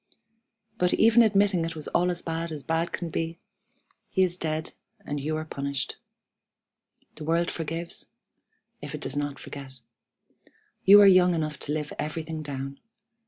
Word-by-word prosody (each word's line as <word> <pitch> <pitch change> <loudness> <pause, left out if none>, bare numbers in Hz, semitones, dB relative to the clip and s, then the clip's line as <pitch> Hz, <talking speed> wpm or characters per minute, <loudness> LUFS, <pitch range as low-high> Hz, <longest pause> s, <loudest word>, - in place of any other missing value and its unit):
But, 180 0 +3
even 230 +1 +6
admitting 200 -5 +3
it 165 0 -3
was 155 - -6
all 180 +1 +2
as 175 -1 -2
bad 165 0 -3
as 150 -3 -6
bad 165 +4 0
could 170 -2 -4
be, 165 +2 -2 0.7
he 190 - +3
is 180 -1 0
dead, 160 -2 -3 0.3
and 145 0 -3
you 155 +2 -1
are 155 - -4
punished. 140 -2 -3 1.2
The 155 - -7
world 170 +2 +1
forgives, 165 +1 -5 0.7
if - - -5
it - - -8
does - - -1
not 145 -1 -2
forget. 135 -3 -9 1.0
You 200 +2 +10
are - - +8
young 180 -2 +6
enough 155 -3 -2
to - - -4
live 150 -1 -2
everything 155 +1 -3
down. 140 -2 -6
165 Hz, 160 wpm, -27 LUFS, 150-175 Hz, 1.2 s, You